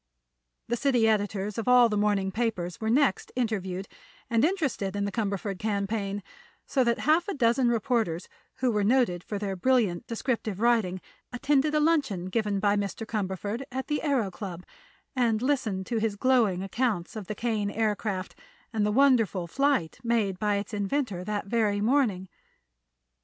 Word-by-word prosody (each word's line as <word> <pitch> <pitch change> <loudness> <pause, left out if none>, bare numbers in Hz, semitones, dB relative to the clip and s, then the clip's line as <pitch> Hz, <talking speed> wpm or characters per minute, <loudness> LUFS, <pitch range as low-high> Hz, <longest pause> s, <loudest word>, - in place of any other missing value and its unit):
The 240 - 0
city 245 -4 +3
editors 205 -1 0
of 230 - -4
all 250 -1 +7
the 215 - -2
morning 205 -2 +1
papers 190 -5 -2
were 220 - -1
next 255 -4 +2
interviewed 195 -6 -2 0.4
and 230 +1 +3
interested 295 - 0
in 200 0 0
the 200 - -2
Cumberford 200 -2 -2
campaign, 200 -1 -2 0.4
so 265 - +2
that 235 -1 +1
half 320 +5 +3
a 400 - -2
dozen 240 -1 +3
reporters 225 -7 0 0.3
who 255 -1 +1
were 210 -2 +1
noted 210 -6 +2
for 210 - -4
their 200 -1 -3
brilliant 215 -4 +1
descriptive 230 -4 -2
writing 220 -6 +2 0.3
attended 280 +4 +1
a - - +4
luncheon 280 - +1
given 210 -1 0
by 205 0 +2
Mr. 205 +2 -3
Cumberford 205 +1 -3
at 260 0 -3
the 295 +1 -1
Aëro 265 -10 +1
Club 180 -1 -7 0.5
and 235 -4 +2
listened 225 -8 0
to 230 +1 -1
his 215 -2 0
glowing 220 -6 +2
accounts 205 -3 -1
of 210 -4 -6
the 215 - -4
Kane 215 -2 -1
Aircraft 210 -3 -2 0.4
and 215 -2 +1
the 210 - +2
wonderful 225 -8 +3
flight 265 - 0
made 220 -6 0
by 210 0 +1
its 200 +2 -4
inventor 205 -2 -1
that 210 0 -2
very 210 -1 +1
morning. 215 -5 +1
215 Hz, 165 wpm, -27 LUFS, 200-245 Hz, 0.5 s, all